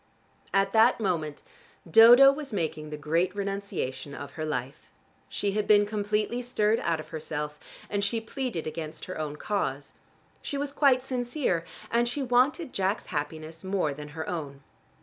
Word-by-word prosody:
At 195 0 +2
that 225 +3 +5
moment 165 -8 -2 0.4
Dodo 240 +9 +9
was 280 -1 -6
making 155 -5 -3
the 150 - -5
great 165 +5 0
renunciation 195 -9 -4
of 140 -1 -7
her 155 - -5
life. 135 -2 -4 0.4
She 200 - -1
had 210 +1 -1
been 205 -1 +6
completely 210 +3 -1
stirred 225 -3 +1
out 165 -2 0
of 155 - -9
herself 150 -1 -5 0.3
and 205 0 -1
she 215 +3 +1
pleaded 225 - -4
against 155 0 -6
her 185 - -6
own 150 -1 -3
cause. 145 -7 -3 0.5
She 285 - -4
was 285 0 -2
quite 270 -3 +3
sincere 245 - -1 0.3
and 235 +1 +2
she 275 +3 -2
wanted 260 +5 +2
Jack's 195 +2 0
happiness 155 +2 -4
more 190 -6 0
than 150 +1 -8
her 160 - -4
own. 140 -5 -5
195 Hz, 160 wpm, -28 LUFS, 155-235 Hz, 0.5 s, Dodo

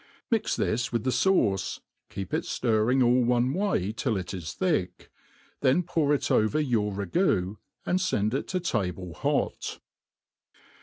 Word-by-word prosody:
Mix 225 -2 +1
this 120 +4 -1
with 115 -2 -1
the 130 - +1
fauce, 120 - +1 0.3
keep 95 -2 -6
it - - +1
flirring 120 +2 +2
all 125 +1 +4
one 125 +2 +2
way 185 - 0
till 115 -1 -1
it 90 0 -5
is 85 -3 -5
thick; 160 - -1 0.5
then 135 +8 +3
pour 160 -4 0
it 145 - +1
over 110 +8 +3
your 115 -8 +1
ragoo, 100 - 0 0.3
and 185 +1 +1
fend 110 - 0
it 135 - -2
to 185 - -1
table 95 - -2
hot. - - -2
120 Hz, 150 wpm, -27 LUFS, 100-150 Hz, 0.5 s, all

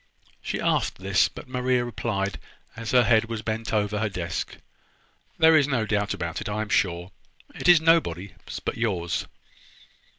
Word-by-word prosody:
She - - -3
asked - - 0
this; 95 0 +2
but - - -11
Maria 125 -1 0
replied, 100 -4 -3 0.4
as 115 -1 -6
her 125 -1 +5
head 115 -2 +4
was 115 -1 -5
bent 110 +1 -3
over 105 -1 0
her 110 0 0
desk: 90 -3 -4 0.8
"There 160 0 +6
is 145 -3 +4
no 125 -6 0
doubt 105 -2 0
about 85 0 -4
it. - - -4
I 105 +1 -1
am 110 - -9
sure. 90 -2 0 0.4
It - - -4
is 175 -2 +8
nobody's 100 - +2 0.3
but - - -2
yours." 95 -7 -1
110 Hz, 165 wpm, -25 LUFS, 95-120 Hz, 0.8 s, is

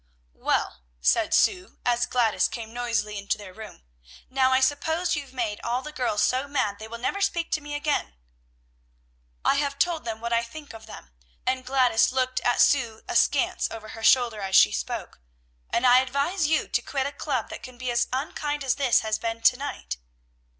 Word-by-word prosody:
"Well," - - -1 0.2
said - - +2
Sue, 370 -2 +2
as 240 0 +2
Gladys 235 -4 +2
came 225 -1 -7
noisily 230 -4 -2
into 200 - -1
their 205 -3 -11
room, 215 - -11 0.5
"now 260 0 +3
I 260 - +4
suppose 320 +6 +1
you've 285 -2 -6
made 235 -5 -3
all 245 +2 -1
the 300 - -7
girls 245 -7 0
so 260 +2 +1
mad 255 -8 -1
they 220 - -8
will 230 +1 -7
never 325 +12 -2
speak 345 -4 0
to 305 - 0
me 290 0 -6
again." 290 - -1 1.3
"I 280 - +4
have 280 -1 -1
told 340 +1 +1
them 225 -2 -4
what 235 +1 -3
I 230 - +3
think 285 +5 -10
of 220 -1 -12
them," 65 - -11 0.3
and 255 0 0
Gladys 250 -4 +3
looked 255 0 0
at 245 - +2
Sue 235 -6 +2
askance - - +2
over 220 -1 -8
her 225 - -9
shoulder 235 -4 +4
as 190 -1 -1
she 105 - +7
spoke, - - -4 0.5
"and 240 - +1
I 250 0 +7
advise 280 +6 0
you 320 +1 +1
to - - 0
quit 270 -2 -2
a 280 - -2
club 265 -6 -3
that - - -7
can 255 -1 -11
be 250 0 -3
as 235 0 +1
unkind 290 +2 -2
as 265 -1 +1
this 270 -4 +3
has 220 0 -1
been 230 0 -3
to 240 - +6
night." 65 - -5
250 Hz, 195 wpm, -26 LUFS, 225-280 Hz, 1.3 s, she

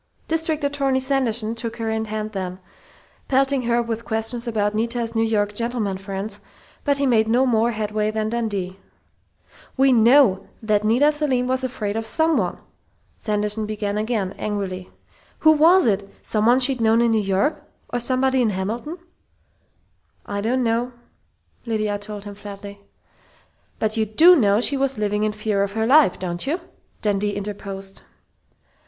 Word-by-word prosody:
District 320 -1 -1
Attorney 280 -2 +1
Sanderson 245 -5 +1
took 230 0 -5
her 225 -1 -3
in 220 0 -1
hand 215 0 -4
then, 185 -3 -4 0.7
pelting 270 0 +2
her 240 0 +2
with 230 0 -4
questions 225 +2 -2
about 210 -2 0
Nita's 230 +1 -2
New 225 - +1
York 210 -2 0
"gentlemen 225 -4 -2
friends," 195 +1 -5 0.4
but 285 -1 +1
he 280 - 0
made 225 -4 +3
no 245 +4 +3
more 230 -2 +2
headway 215 -1 -1
than 215 0 -2
Dundee. 200 -5 -3 1.0
"We 270 0 +4
know 235 -3 +5 0.2
that 210 -1 +1
Nita 245 +8 +4
Selim 290 -5 +1
was 260 +1 0
afraid 215 -5 -3
of 225 0 -3
someone!" 300 - +1 0.6
Sanderson 210 0 -1
began 210 -1 -3
again, 210 -3 -1
angrily. 195 -3 -4 0.5
"Who 315 - +7
was 330 +5 +5
it 200 -3 0
someone 230 +4 +2
she'd 260 -1 +2
known 225 0 +4
in 235 -1 +3
New 220 -1 +2
York, 195 +10 0 0.3
or 245 - 0
somebody 260 +1 +1
in 230 - +2
Hamilton?" 220 - -4 1.3
"I 200 0 -3
don't 250 +4 0
know!" 235 +2 0 0.7
Lydia 215 -2 -1
told 205 0 -8
him 205 - -7
flatly. 200 0 -10 1.0
"But 220 +1 -1
you 220 -1 +1
do 330 - +7
know 210 -6 +3
she 280 - +3
was 270 -2 0
living 210 0 -1
in 215 0 +1
fear 210 -1 -1
of 200 0 -1
her 220 +1 0
life, 275 -4 +5
don't 175 +3 -4
you?" 325 +6 0 0.4
Dundee 205 -1 0
interposed. 195 -1 -6
220 Hz, 155 wpm, -22 LUFS, 205-255 Hz, 1.3 s, Who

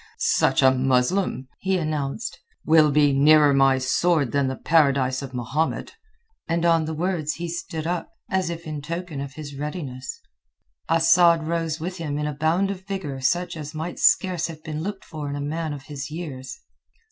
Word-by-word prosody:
"Such - - +2
a 130 - +7
Muslim," 130 +4 +1
he 190 0 0
announced, 155 +4 -3 0.3
"will 155 -1 +6
be 145 -1 +4
nearer 150 +1 +6
my 135 -1 +4
sword 140 +2 +1
than 140 -1 +1
the 130 - -2
Paradise 140 -5 +2
of 135 -1 -7
Mahomet." 130 +6 -2 0.5
And 170 0 0
on 165 -2 +3
the 160 0 -4
words 165 -2 -1
he 175 0 -4
stood 165 -2 -5
up, 175 +1 -2 0.2
as 190 -2 0
if 170 0 -6
in 155 -2 -5
token 165 -1 -5
of 140 -1 -6
his 145 -2 -8
readiness. 140 -4 -5 0.7
Asad 165 0 +5
rose 165 -1 -1
with 180 +3 -4
him 150 -4 -3
in 150 - -2
a 150 - -2
bound 165 +7 +1
of 195 - -5
a - - -27
vigour 185 -9 -5
such 175 +8 0
as 150 -1 -7
might 160 +3 -5
scarce 180 -3 +3
have 160 -2 -10
been 155 -1 -4
looked 195 +2 -5
for 150 -3 -6
in 140 - -3
a - - -4
man 155 +2 -3
of 145 -2 -7
his 145 -2 -7
years. 150 -5 -7
155 Hz, 185 wpm, -24 LUFS, 140-170 Hz, 0.7 s, a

